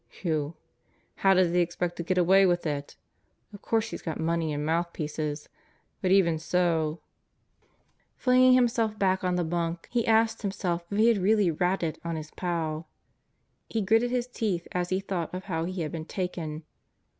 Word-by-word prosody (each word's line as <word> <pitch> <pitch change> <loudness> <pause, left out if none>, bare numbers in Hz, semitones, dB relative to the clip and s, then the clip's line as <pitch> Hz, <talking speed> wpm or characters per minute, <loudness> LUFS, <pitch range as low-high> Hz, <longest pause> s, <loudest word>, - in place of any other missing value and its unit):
Whew! 155 -2 -1 0.6
How 195 0 +4
does 180 -2 +3
he 180 - +3
expect 175 0 -1
to 170 - -3
get 185 +2 -1
away 190 +2 +5
with 175 -1 +1
it? 145 -2 -3 0.6
Of 205 - -11
course 225 -1 0
he's - - -6
got 160 - -4
money 165 -1 0
and 145 0 -2
mouthpieces. 155 -2 -2 0.5
But 185 - +1
even 175 -4 +4
so.. 165 -2 0 0.6
." - - -40
Flinging 255 0 +5
himself 230 -3 +2
back 190 -2 +1
on 180 -1 +1
the 175 - +1
bunk 170 0 -2
he 240 -2 0
asked 225 0 +3
himself 190 -4 -2
if 200 - -3
he 225 +2 +5
had 225 -4 +3
really 200 -1 +3
"ratted" 175 0 -1
on 170 -1 -3
his 155 -1 -7
pal. 165 -3 -3 0.8
He 225 -2 -1
gritted 225 +4 +3
his 245 -1 0
teeth 210 -8 -2
as 180 0 -1
he 185 - +1
thought 185 -4 -3
of 185 - -5
how 165 -4 -2
he 185 0 -4
had 155 - -4
been 160 -2 -5
taken. 165 -4 -4
180 Hz, 180 wpm, -27 LUFS, 165-200 Hz, 0.8 s, away